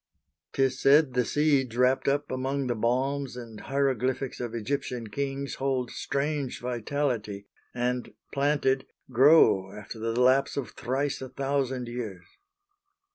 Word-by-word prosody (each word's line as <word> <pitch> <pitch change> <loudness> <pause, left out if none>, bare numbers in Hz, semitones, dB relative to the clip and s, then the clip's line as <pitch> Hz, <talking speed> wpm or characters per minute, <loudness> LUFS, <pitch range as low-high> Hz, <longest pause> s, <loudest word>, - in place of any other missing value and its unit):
'Tis 135 -1 +1
said 145 -1 +5
the 125 0 +2
seeds 135 -4 +1
wrapt 125 +1 +3
up 145 +1 +1
among 135 +2 -1
the 125 - 0
balms 130 +4 -1
And 115 -3 -9
hieroglyphics 130 -1 -1
of 120 -1 -4
Egyptian 120 -1 -3
kings 140 +2 -3
Hold 130 -2 0
strange 140 -1 -2
vitality, 120 -4 -2 0.3
and, 125 0 -2 0.2
planted, 140 -2 +1 0.2
grow 125 -7 +5
After 105 +3 -9
the 115 +2 -1
lapse 130 +3 +3
of 140 - -3
thrice 135 +4 -2
a 130 - -6
thousand 135 -2 -1
years. 110 -7 -6
130 Hz, 130 wpm, -28 LUFS, 120-140 Hz, 0.3 s, said